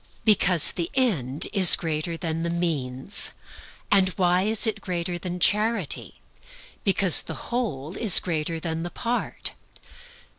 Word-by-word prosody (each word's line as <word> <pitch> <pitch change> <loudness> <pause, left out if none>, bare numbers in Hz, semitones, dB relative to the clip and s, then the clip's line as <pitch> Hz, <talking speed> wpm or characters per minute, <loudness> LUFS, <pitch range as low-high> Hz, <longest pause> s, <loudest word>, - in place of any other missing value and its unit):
Because 185 -6 +3
the 170 -1 -4
end 165 - 0
is 190 -3 +8
greater 165 +1 -4
than 165 -1 -4
the 170 - -3
means. 155 -3 -2 0.6
And 195 -2 +4
why 180 -1 +2
is 220 +1 +1
it 215 -2 -2
greater 175 -2 -4
than 180 0 -5
charity? 210 -2 0 0.6
Because 195 -3 +4
the - - -9
whole 170 - -4
is 215 -5 +6
greater 165 -1 -3
than 160 0 -4
the 175 - -5
part. 240 +6 -4
175 Hz, 135 wpm, -24 LUFS, 165-200 Hz, 0.6 s, is